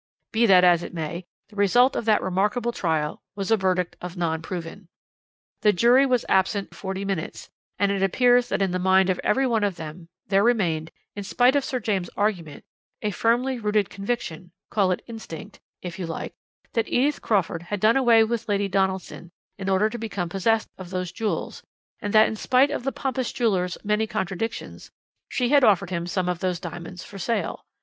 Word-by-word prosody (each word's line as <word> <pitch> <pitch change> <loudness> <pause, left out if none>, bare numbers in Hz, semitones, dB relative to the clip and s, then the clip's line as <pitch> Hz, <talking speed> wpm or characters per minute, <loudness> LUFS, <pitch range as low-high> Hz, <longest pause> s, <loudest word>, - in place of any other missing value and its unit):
"Be 230 +1 +3
that 185 -2 +7
as 175 -2 +5
it 175 - -8
may, 170 +2 -4 0.2
the 210 - -17
result 245 +6 +4
of - - -2
that 215 -2 +3
remarkable 210 +6 0
trial 160 -8 -1
was 200 +1 -3
a - - +7
verdict 185 -3 0
of 180 +1 -7
'Non 160 -2 -1
Proven.' 175 +2 -7 0.7
The 210 - +4
jury 245 +8 +5
was 250 -3 +1
absent 195 +1 +1
forty 195 0 -5
minutes, 195 -5 -4 0.3
and 200 +1 +2
it 200 -1 -1
appears 245 +5 +3
that - - +1
in 190 - 0
the 185 - -1
mind 190 +1 +4
of 180 - -3
every 265 +6 +2
one 230 -4 +1
of 200 -3 0
them 165 +1 -9 0.2
there 195 0 +3
remained, 175 -9 +1 0.3
in 205 - -5
spite 245 +6 +3
of 285 - +2
Sir 260 -1 -2
James' 195 -6 -1
arguments, 180 -8 -2 0.4
a 210 - 0
firmly 240 +5 +1
rooted 210 -2 0
conviction 195 -5 -4 0.2
call 200 -3 +2
it 185 - -1
instinct, 220 -9 -9 0.2
if 180 +1 -6
you 180 - -3
like 165 - -5 0.4
that 230 -1 0
Edith 280 +4 +1
Crawford 190 -5 0
had 200 +4 -4
done 215 +4 +4
away 235 -4 +5
with 230 0 -3
Lady 200 -1 +1
Donaldson 190 -2 -2 0.3
in 195 0 -3
order 190 +2 +3
to 235 +2 -6
become 200 -6 -3
possessed 220 +5 0
of 185 -2 -8
those 185 -2 -3
jewels, 225 -2 -3 0.4
and 205 - -3
that 215 +1 +6
in - - -3
spite 260 +5 +3
of 290 - -3
the 270 - 0
pompous 260 -2 -2
jeweller's 185 -7 0
many 210 +1 +1
contradictions, 215 +1 -4 0.4
she 245 -2 0
had 285 -1 +5
offered 195 -5 +3
him 170 -1 -2
some 180 0 -1
of 180 -1 -1
those 180 -2 -1
diamonds 175 +1 -8
for 200 - -10
sale. 230 +5 -2
200 Hz, 195 wpm, -24 LUFS, 180-225 Hz, 0.7 s, that